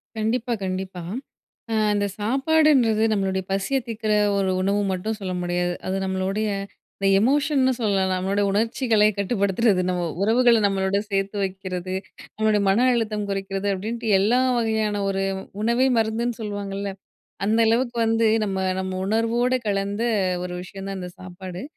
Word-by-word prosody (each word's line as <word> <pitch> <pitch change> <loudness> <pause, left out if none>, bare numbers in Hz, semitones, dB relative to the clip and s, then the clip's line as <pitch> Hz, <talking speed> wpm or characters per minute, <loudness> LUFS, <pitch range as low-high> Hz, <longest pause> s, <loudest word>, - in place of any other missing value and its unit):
கண்டிப்பா, 225 +2 -1
கண்டிப்பா. 185 -1 -4 0.7
ஆ - - +1 0.2
இந்த 205 0 +1
சாப்பாடுன்றது 265 -1 +3
நம்பளுடைய 190 -2 0
பசிய 195 +8 0
தீக்கிற 220 -1 -2 0.3
ஒரு 195 -1 +1
உணவு 200 +2 +1
மட்டும் 210 +4 -2
சொல்ல 190 -2 -4
முடியாது. 175 0 -1
அது 190 - -1
நம்பளுடைய 190 +3 -1 0.5
இந்த 195 - +1
எமோஷன்னு 275 +2 +2
சொல்லலாம். 195 -4 +1
நம்பளோட 190 +2 0
உணர்ச்சிகளை 225 +1 +2
கட்டுப்படுத்துறது, 200 0 +1
நம்ப 180 -1 -1 0.2
உறவுகள 235 +2 +4
நம்பளோட 195 0 +1
சேர்த்து 195 0 -1
வைக்குறது, 185 -1 -4 0.4
நம்பளோட 215 -1 +2
மன 220 +6 +3
அழுத்தம் 215 -3 -1
குறைக்கிறது. 195 0 -3
அப்டீன்ட்டு 220 +3 -2
எல்லா 220 +6 +3 0.2
வகையான 220 -3 0
ஒரு 195 0 -1 0.4
உணவே 235 +4 +3
மருந்துன்னு 225 +2 0
சொல்லுவாங்கல்ல, 200 -1 -4 0.6
அந்த 220 +2 +2
அளவுக்கு 240 +1 +1
வந்து 225 0 +2 0.2
நம்ப 190 -2 -2 0.2
நம்ம 190 0 -3
உணர்வோட 230 +4 +1
கலந்த 200 +2 -1 0.4
ஒரு 180 - -5
விஷயம் 195 +1 -8
தான் 195 -1 -4
இந்த 180 0 -6
சாப்பாடு. 185 0 -8
205 Hz, 135 wpm, -23 LUFS, 190-225 Hz, 0.7 s, உறவுகள